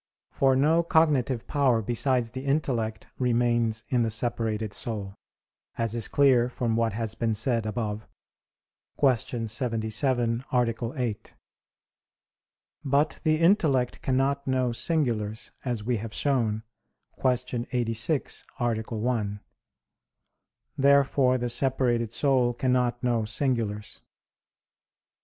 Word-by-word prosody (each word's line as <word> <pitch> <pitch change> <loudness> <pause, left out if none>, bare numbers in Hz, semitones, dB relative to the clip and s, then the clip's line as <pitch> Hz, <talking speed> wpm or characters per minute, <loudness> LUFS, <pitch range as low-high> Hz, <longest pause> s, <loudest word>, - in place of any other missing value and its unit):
For 135 -1 +3
no 155 +5 +3
cognitive 145 -8 +2
power 135 -6 +2
besides 120 +1 0
the 130 0 -6
intellect 125 -6 -1
remains 120 -3 +1
in 125 -2 +2
the 115 - +1
separated 110 -2 -2
soul, 100 -3 -3 0.6
as 115 -1 -1
is 115 -2 0
clear 130 -4 +4
from 120 -2 -1
what 115 -1 +1
has 110 0 -3
been 115 -1 -1
said 115 0 0
above 110 -1 -3 0.9
(Q. 120 -3 +1
77, 115 +1 0
A. 115 -1 0
8). 115 -5 -4 1.5
But 145 +2 +1
the 155 -1 +2
intellect 160 - +2
cannot 135 +2 0
know 130 -2 +1
singulars, 115 -6 -1
as 120 -5 -3
we 120 +1 0
have 110 +1 -6
shown 115 -6 +1 0.6
(Q. 125 -1 0
86, 120 +4 -1 0.2
A. 120 -3 0
1). 110 -2 -2 1.4
Therefore 135 -2 +4
the 120 0 -2
separated 120 -2 +1
soul 125 -2 +2
cannot 125 -1 0
know 120 -2 +1
singulars. 110 -2 -2
120 Hz, 110 wpm, -27 LUFS, 115-130 Hz, 1.5 s, clear